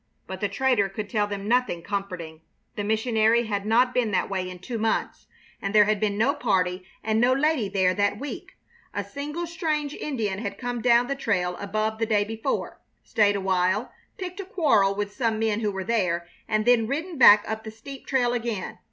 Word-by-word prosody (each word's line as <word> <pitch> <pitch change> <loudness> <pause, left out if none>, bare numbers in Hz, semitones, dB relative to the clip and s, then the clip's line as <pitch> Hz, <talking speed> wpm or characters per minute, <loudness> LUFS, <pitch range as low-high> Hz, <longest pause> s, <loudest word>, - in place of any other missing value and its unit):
But - - -7
the - - 0
trader 250 -7 +1
could 205 0 -6
tell 210 -2 +1
them 200 0 -5
nothing 240 -8 +1
comforting. 180 -6 -5 0.3
The 205 - -3
missionary 220 +1 +2
had 205 -1 -3
not 250 +3 +3
been 245 -3 +1
that 195 0 0
way 185 -1 -2
in 180 - -8
two 225 +6 -5
months, 220 0 -1 0.3
and 195 +2 -3
there 210 -1 +7
had 210 -1 +1
been 205 -1 0
no 245 +6 +3
party 185 -9 0 0.2
and 220 0 +1
no 250 +1 +4
lady 275 -6 +1
there 185 -2 +2
that 205 +1 0
week. 285 +1 -7 0.4
A 205 - -1
single 290 - -5
strange 310 -3 -2
Indian 220 -12 -3
had 205 -2 -5
come 245 -2 -4
down 240 0 +4
the 275 - -2
trail 180 -9 -1
above 215 +2 -2
the 225 - 0
day 210 -2 +3
before, 225 +5 -3 0.2
stayed 205 -3 +2
awhile, 190 +3 0 0.3
picked 365 0 -6
a - - -3
quarrel 275 - +2
with 205 0 -3
some 230 -4 0
men 220 -1 0
who 210 -2 0
were 190 -1 -4
there, 180 -5 0 0.2
and 215 0 0
then 240 -2 +4
ridden 315 +4 -3
back 210 -4 +8
up 220 0 -4
the 220 - -6
steep 255 +5 -11
trail 245 -2 +2
again. 230 -5 -3
220 Hz, 200 wpm, -25 LUFS, 200-250 Hz, 0.4 s, back